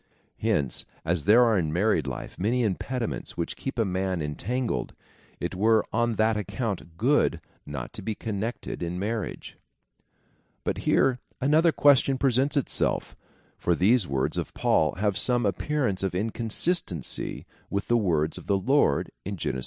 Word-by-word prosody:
Hence, 70 -4 0 0.2
as 85 -2 0
there 110 +5 +7
are 110 -4 +3
in 80 -3 -1
married 85 -3 +1
life 65 - -6
many 120 +6 +1
impediments 115 +4 -3
which 85 - -2
keep 135 - -5
a 115 - +2
man 95 -1 -1
en 75 -1 -3
tangled, 125 - -2 0.4
it - - -3
were 110 +3 +3
on 120 -1 +1
that 110 +1 +2
account 100 -5 -4
good 120 - +2 0.3
not 70 -4 -6
to - - -7
be 110 +2 -3
connected 110 0 -4
in 85 +1 -3
marriage. 105 +1 -4 1.1
But - - -2
here 130 -2 +3 0.2
another 155 +5 +4
question 140 -2 +4
presents 135 +2 +2
itself, 140 - 0 0.4
for 85 - +2
these 105 +3 +3
words 65 -1 0
of - - -5
Paul 75 - +2
have 100 0 0
some 120 -2 +2
appearance 105 0 0
of 95 -2 -1
inconsistency 110 - -1 0.2
with 100 - -2
the 120 - +3
words 80 -8 +1
of - - -14
the 100 - +3
Lord, 120 - +2
in 100 +1 -4
Gen. 75 - -2
ii. - - -3
105 Hz, 160 wpm, -27 LUFS, 90-125 Hz, 1.1 s, there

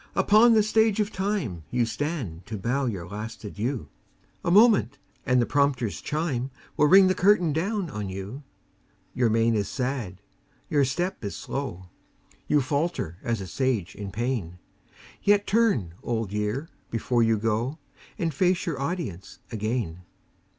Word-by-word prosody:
upon 225 +3 +6
the 215 - +5
Stage 220 0 +3
of 210 -1 0
Time 190 - -2
You 120 -1 +1
stand 115 - -4
to 110 0 -4
bow 125 +7 0
your 95 -7 -4
last 105 +4 -7
adieu; 110 - -3 0.6
A - - 0
moment, 205 - +5 0.3
and 125 0 +4
the 120 - +3
prompter's 135 -6 +1
chime 145 -5 -2 0.3
Will 150 - +4
ring 190 +4 +8
the 185 - +4
curtain 180 -4 +3
down 195 +4 -1
on 105 -9 -5
you. 95 +8 -6 0.7
Your 120 -2 +2
mien 115 +1 +3
is 105 -2 0
sad, 125 -8 -3 0.5
your 145 -2 +4
step 175 +4 -2
is 100 - -4
slow; 95 -10 -5 0.6
You 150 - +3
falter 140 - -2
as 115 -3 -2
a - - -5
Sage 115 -2 -1
in 100 -1 -6
pain; 110 -6 -2 0.6
Yet 205 0 +3
turn, 200 - +2
Old 115 -4 -2
Year, 105 +9 -2 0.2
before 120 +1 0
you 115 -1 +3
go, 115 +6 -1 0.4
And 165 -2 -1
face 180 +4 +2
your 155 -5 -3
audience 140 - -4
again. 110 -6 -2
125 Hz, 150 wpm, -26 LUFS, 105-170 Hz, 0.7 s, ring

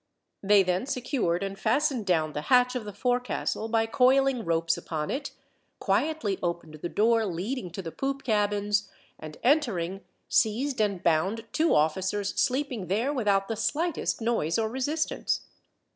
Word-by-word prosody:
They 200 0 +5
then 185 +7 -1
secured 250 - -1
and 195 0 -5
fastened 275 -7 +1
down 160 -4 +1
the 150 - -3
hatch 250 -1 +5
of 250 -4 -4
the 205 - -6
forecastle 245 0 -1
by 225 0 +2
coiling 260 +1 +3
ropes 165 -1 +1
upon 155 -2 -4
it, 280 - -3 0.5
quietly 300 -11 0
opened 170 -2 -3
the 175 - -3
door 225 +3 +3
leading 190 +5 -3
to 185 +3 -7
the 165 - -5
poop 275 +5 -3
cabins, 205 -2 +1 0.3
and 155 -1 -9
entering, 200 - +1 0.3
seized 245 +4 +1
and 200 -4 0
bound 190 +8 +1
two 320 +1 +2
officers 190 +6 0
sleeping 255 -7 -1
there 225 - 0
without 200 -7 +1
the 225 - -2
slightest 275 +8 -1
noise 225 -9 0
or 220 -1 0
resistance. 290 +6 -1
215 Hz, 150 wpm, -27 LUFS, 185-255 Hz, 0.5 s, They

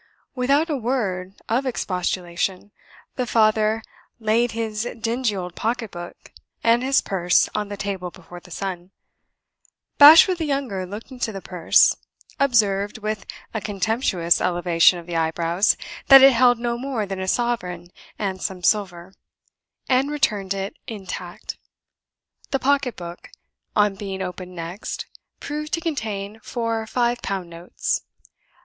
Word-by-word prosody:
Without 275 +5 +2
a 310 - -1
word 205 -7 -2
of 240 +4 +1
expostulation, 185 -2 -2 0.5
the 250 -2 -1
father 220 0 +2 0.4
laid 225 +2 +1
his 225 0 -2
dingy 230 0 0
old 180 -2 -5
pocket 225 0 -2
book 175 0 -10 0.3
and 230 +1 +4
his 265 +1 +2
purse 180 -2 +2
on 210 -1 -2
the 205 - -6
table 195 -3 -3
before 175 0 -12
the 180 - -17
son. 180 -1 -5 1.1
Bashwood 325 +5 +9
the 325 - -1
younger 265 -10 -2
looked 210 +7 -8
into 245 -3 -3
the 195 - -6
purse; 180 -3 +3 0.4
observed, 210 -7 +2
with 215 -1 -4 0.3
a 220 - -2
contemptuous 195 -4 +1
elevation 175 -1 +3
of 170 - -9
the 175 -1 -5
eyebrows, 165 +4 +1 0.3
that 270 -1 +10
it 270 0 +9
held 245 0 +5
no 235 0 -2
more 255 -5 -2
than 195 -1 -5
a 190 - -3
sovereign 180 -7 -1 0.3
and 190 -2 -3
some 185 -2 -4
silver; 190 -3 0 0.7
and 265 +2 +2
returned 205 -10 0
it 195 +1 -4
intact. 190 -4 -7 0.9
The 270 - +1
pocket 275 -2 +1
book, 175 0 -9 0.5
on 210 -1 +3
being 195 -2 -4
opened 180 0 -7
next, 170 +4 -5 0.3
proved 300 +1 -5
to - - +2
contain 220 - -4
four 230 -2 -3
five 240 +1 0
pound 185 -3 -4
notes. 170 +1 -3
210 Hz, 140 wpm, -23 LUFS, 185-240 Hz, 1.1 s, that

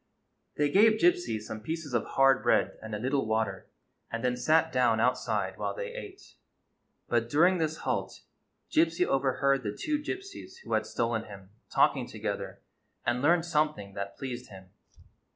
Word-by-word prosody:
They 145 -1 +1
gave 215 +4 +5
Gypsy 355 - +2
some 110 0 -7
pieces 160 +2 -5
of 120 - +2
hard 135 -1 +4
bread - - +2
and 110 -1 -5
a - - -2
little 130 +2 0
water, 110 -4 -1 0.4
and 115 +1 -4
then 125 -1 +1
sat 160 +6 +2
down 125 -3 +3
outside 125 +3 0
while - - -2
they 485 -1 -5
ate. 410 -5 -10 0.7
But 120 -1 0
during 175 +7 +4
this 160 0 -1
halt - - -2 0.5
Gypsy 165 +2 +3
overheard 135 0 +1
the 105 -3 -5
two 300 -1 0
Gypsies 385 +8 -7
who - - -5
had - - +1
stolen 115 -1 -1
him 100 -2 -12 0.2
talking - - +2
together, - - -5 0.4
and 120 +1 +1
learned 165 +3 +3
something 150 - -1
that 100 0 -6
pleased 125 -2 -6
him. 95 -2 -13
135 Hz, 160 wpm, -29 LUFS, 110-165 Hz, 0.7 s, gave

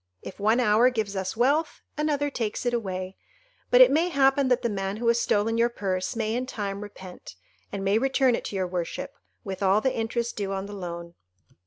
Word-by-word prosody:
If - - -9
one 220 +4 +3
hour 230 +1 +4
gives 220 -5 -3
us 190 +2 -3
wealth, 290 +6 +1
another 290 -1 0
takes 225 -2 -3
it 245 - +1
away; 190 -4 -3 0.5
but - - +6
it - - +8
may 330 +4 +2
happen 275 -3 +3
that 250 0 +2
the - - +2
man 195 -2 -3
who 235 +1 -2
has 235 0 +3
stolen 225 +1 +1
your 235 +1 +4
purse 190 -1 -3
may 220 -1 -1
in 250 +2 -2
time 200 -4 -4
repent, 190 - -10 0.4
and 195 - -4
may 200 +3 +3
return 265 0 +2
it - - -2
to - - -5
your 190 -1 0
worship, 180 -1 -4 0.3
with 195 -2 -6
all 195 +1 +4
the 260 +4 0
interest 230 +1 -2
due 195 -2 -3
on 195 0 -3
the 205 - -8
loan." 170 -3 -7
220 Hz, 210 wpm, -26 LUFS, 195-250 Hz, 0.5 s, it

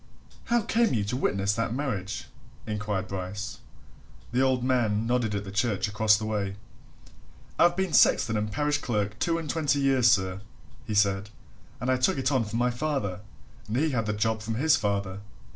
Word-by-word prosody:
"How 235 -2 +2
came 230 - +2
you 105 - +1
to 105 +5 -3
witness 100 -6 0
that 115 +1 -1
marriage?" 105 -9 -3 0.4
inquired 105 -3 -3
Bryce. 100 +3 -5 0.7
The 125 +2 +1
old 130 -2 +2
man 115 -4 +1
nodded 120 -3 0
at 100 - -2
the 100 - -8
church 100 0 0
across 105 +1 +3
the 110 - -4
way. 100 -3 -2 1.0
"I've 175 0 +5
been 190 -2 -1
sexton 110 -1 +4
and 105 0 -1
parish 145 +4 0
clerk 105 -5 -2
two 165 -1 +1
and 160 -3 -3
thirty 145 -3 +1
years, 135 -3 +4
sir," 95 -3 +1 0.4
he 105 - -3
said. 100 0 +2 0.5
"And 125 +2 0
I 130 - +2
took 130 +2 +2
it 130 +1 0
on 130 -4 +2
from 110 +2 -4
my 125 +1 +2
father 120 -8 -2 0.5
and 110 +3 -2
he 155 +3 +1
had 115 -4 -1
the 105 - 0
job 110 +1 0
from 110 +1 -3
his 155 +6 +4
father." 100 -4 -2
110 Hz, 185 wpm, -27 LUFS, 105-130 Hz, 1.0 s, I've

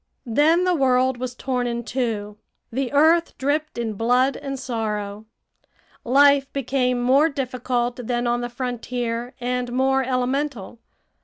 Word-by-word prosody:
Then 300 +9 +3
the 365 0 +2
world 260 -3 +2
was 250 -1 -4
torn 250 -1 -2
in 235 0 -3
two. 215 -5 -3 0.3
The 255 +1 -2
earth 320 +4 +3
dripped 295 +2 -1
in 230 -2 -2
blood 245 +5 +2
and 275 -1 -5
sorrow. 215 -4 -4 0.8
Life 280 +2 +4
became 255 -2 0
more 270 +6 +4
difficult 250 -3 -2
than 240 0 -1
on 240 0 0
the 240 - -3
frontier, 245 -1 -4
and 250 0 -2
more 265 +2 +2
elemental. 255 -3 -2
250 Hz, 135 wpm, -23 LUFS, 240-275 Hz, 0.8 s, Life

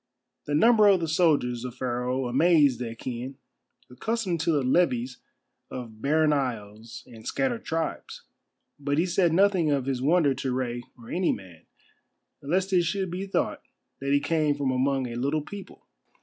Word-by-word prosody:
The 145 - -1
number 220 +5 +6
of 195 -2 +5
the 165 - -2
soldiers 150 -8 +2
of 125 -1 -6
Pharaoh 125 +1 -2
amazed 145 0 +4
the 125 - -3
Achæan, 120 +3 -6 0.5
accustomed 185 - -2
to 165 +2 +1
the 145 -4 +1
levies 125 -3 +1 0.5
of 115 -4 -8
barren 155 +2 +3
isles 115 -4 -4
and 110 -2 -12
scattered 245 -4 -1
tribes. 165 0 -4 0.6
But 145 0 -1
he 165 - +3
said 175 -1 +2
nothing 185 -2 +3
of 140 -3 0
his 135 -2 -2
wonder 150 0 +3
to 130 0 -3
Rei 125 -1 -2 0.2
or 115 -1 -12
any 180 0 +1
man, 90 -4 -9 0.7
lest 185 +7 -1
it 180 - +5
should 185 +2 -2
be 190 +3 -4
thought 195 - -1 0.4
that 140 +1 -2
he 145 - +4
came 150 0 +1
from 140 -2 -1
among 130 +1 +1
a 120 - -5
little 140 +5 -1
people. 200 +4 -10
145 Hz, 165 wpm, -26 LUFS, 125-170 Hz, 0.7 s, number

